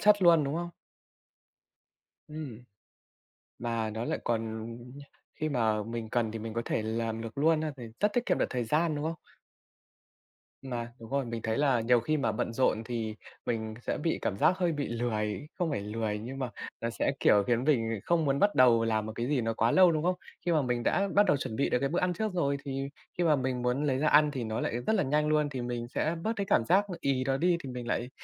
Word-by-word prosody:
chất 210 Hz, -2 st, +5 dB
luôn, 170 Hz, -4 st, +6 dB
đúng 140 Hz, +1 st, -2 dB
không? 170 Hz, +1 st, -3 dB, 1.6 s
Ừm. 145 Hz, -7 st, -7 dB, 1.0 s
Mà 115 Hz, -2 st, -1 dB
nó 110 Hz, +2 st, -4 dB
lại -, -, -1 dB
còn, 115 Hz, -1 st, 0 dB
ừm, 115 Hz, +2 st, -8 dB, 0.4 s
khi 155 Hz, -, -2 dB
mà 110 Hz, -6 st, +1 dB
mình 115 Hz, 0 st, -5 dB
cần 115 Hz, -3 st, 0 dB
thì 115 Hz, -, -5 dB
mình 110 Hz, 0 st, -5 dB
có 115 Hz, -, -1 dB
thể -, -, 0 dB
làm 115 Hz, 0 st, -2 dB
được 115 Hz, +3 st, -7 dB
luôn 155 Hz, +2 st, +3 dB
ha 155 Hz, -1 st, -2 dB
thì 125 Hz, -, -8 dB, 0.2 s
rất 210 Hz, 0 st, +2 dB
tiết 245 Hz, 0 st, +1 dB
kiệm -, -, +2 dB
được -, -, +2 dB
thời 125 Hz, -2 st, -1 dB
gian, 155 Hz, +7 st, +1 dB
đúng 145 Hz, -, -3 dB
không? 165 Hz, +1 st, -2 dB, 1.4 s
Mà 120 Hz, -3 st, -5 dB
đúng 115 Hz, -1 st, -11 dB
rồi, 140 Hz, -1 st, 0 dB
mình 115 Hz, -1 st, -4 dB
thấy 110 Hz, 0 st, -1 dB
là 135 Hz, -5 st, +3 dB
nhiều 120 Hz, +1 st, +4 dB
khi 155 Hz, +7 st, 0 dB
mà 140 Hz, -, +1 dB
bận 115 Hz, -, -2 dB
rộn 115 Hz, -2 st, +1 dB
thì 110 Hz, -2 st, -3 dB, 0.3 s
mình 110 Hz, -2 st, -2 dB
sẽ -, -, -2 dB
bị 165 Hz, -, 0 dB
cảm 100 Hz, -, -1 dB
giác 180 Hz, -, +3 dB
hơi 175 Hz, -2 st, +1 dB
bị 145 Hz, -2 st, -2 dB
lười 115 Hz, +1 st, -2 dB
không 175 Hz, -, +1 dB
phải 135 Hz, -, -1 dB
lười 105 Hz, 0 st, -2 dB
nhưng 130 Hz, +5 st, -6 dB
mà 130 Hz, -2 st, -2 dB, 0.3 s
là 115 Hz, -, -1 dB
sẽ, 120 Hz, -, 0 dB
kiểu, 105 Hz, -1 st, +5 dB
khiến 120 Hz, 0 st, +2 dB
mình 125 Hz, -6 st, +2 dB
bị 115 Hz, -2 st, -2 dB
không 170 Hz, -2 st, +2 dB
muốn 140 Hz, 0 st, +1 dB
bắt 205 Hz, 0 st, +3 dB
đầu 120 Hz, -3 st, +6 dB
làm 110 Hz, -1 st, 0 dB
một 110 Hz, -, -5 dB
cái 120 Hz, -, -2 dB
gì 140 Hz, -3 st, +1 dB
nó 115 Hz, 0 st, -1 dB
quá 115 Hz, +1 st, +2 dB
lâu, 185 Hz, -2 st, +6 dB
đúng 155 Hz, -1 st, -1 dB
không? 180 Hz, +1 st, +2 dB, 0.3 s
Khi 175 Hz, -, +2 dB
mà 155 Hz, -2 st, +3 dB
mình 125 Hz, -2 st, -1 dB
đã 195 Hz, +10 st, +2 dB
bắt 205 Hz, -, +6 dB
đầu 145 Hz, -7 st, +3 dB
chuẩn 110 Hz, -, -4 dB
bị 140 Hz, -, +1 dB
được -, -, +2 dB
cái 135 Hz, +1 st, 0 dB
bữa 175 Hz, -, 0 dB
ăn 180 Hz, 0 st, +1 dB
trước 215 Hz, +3 st, -2 dB
rồi, 140 Hz, -6 st, +1 dB
thì 135 Hz, 0 st, -3 dB, 0.3 s
khi 175 Hz, -, +1 dB
mà 160 Hz, -3 st, +4 dB
mình 130 Hz, -2 st, -1 dB
muốn 125 Hz, +4 st, 0 dB
lấy 135 Hz, -3 st, +1 dB
ra 155 Hz, -, +2 dB
ăn 150 Hz, 0 st, +5 dB
thì 130 Hz, -4 st, -3 dB
nó 110 Hz, 0 st, -2 dB
lại -, -, -1 dB
rất 220 Hz, -, +3 dB
là -, -, +2 dB
nhanh 150 Hz, +2 st, +1 dB
luôn, 150 Hz, -1 st, +2 dB
thì 130 Hz, -3 st, -4 dB
mình 120 Hz, -1 st, -3 dB
sẽ 155 Hz, +6 st, -1 dB
bớt 220 Hz, -, 0 dB
cái 200 Hz, -2 st, -2 dB
cảm 115 Hz, -11 st, +2 dB
giác 200 Hz, +6 st, +3 dB
nó 180 Hz, -, -4 dB
ì 135 Hz, -2 st, 0 dB
đó 135 Hz, 0 st, 0 dB
đi 175 Hz, +2 st, +2 dB
thì 135 Hz, -, -6 dB
mình 125 Hz, -1 st, -6 dB
lại 125 Hz, +1 st, -1 dB
130 Hz, 250 wpm, -30 LUFS, 115-155 Hz, 1.6 s, luôn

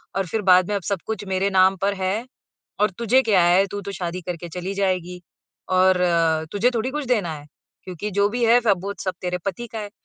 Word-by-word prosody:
और 195 Hz, -, 0 dB
फ़िर 220 Hz, +5 st, -2 dB
बाद 180 Hz, -1 st, +6 dB
में, 205 Hz, -, 0 dB
"अब 200 Hz, -, -2 dB
सब 200 Hz, -3 st, -2 dB
कुछ 215 Hz, -2 st, -3 dB
मेरे 190 Hz, +1 st, 0 dB
नाम 190 Hz, 0 st, +4 dB
पर 200 Hz, 0 st, +1 dB
है, 190 Hz, +5 st, -2 dB, 0.6 s
और 210 Hz, -, +3 dB
तुझे 235 Hz, +3 st, +3 dB
क्या 200 Hz, -7 st, +3 dB
है 185 Hz, +3 st, +4 dB
तू 205 Hz, -, -3 dB
तो 200 Hz, +1 st, -6 dB
शादी 180 Hz, -1 st, -4 dB
करके 175 Hz, 0 st, -6 dB
चली 180 Hz, +3 st, -5 dB
जाएगी 180 Hz, -2 st, -2 dB, 0.6 s
और 185 Hz, 0 st, +5 dB, 0.6 s
तुझे 220 Hz, +5 st, +2 dB
थोड़ी 230 Hz, +3 st, -1 dB
कुछ 300 Hz, 0 st, -3 dB
देना 205 Hz, -10 st, 0 dB
है। 145 Hz, 0 st, -11 dB, 0.4 s
क्योंकि 185 Hz, +3 st, -5 dB
जो 200 Hz, +1 st, +2 dB
भी 240 Hz, +1 st, -1 dB
है 240 Hz, +2 st, +5 dB
सब 200 Hz, -6 st, +2 dB
वो 200 Hz, -, -2 dB
सब 185 Hz, -, -2 dB
तेरे 180 Hz, 0 st, -2 dB
पति 215 Hz, +5 st, -3 dB
का 225 Hz, -, -4 dB
है।" 205 Hz, -1 st, -7 dB
195 Hz, 225 wpm, -22 LUFS, 180-210 Hz, 0.6 s, बाद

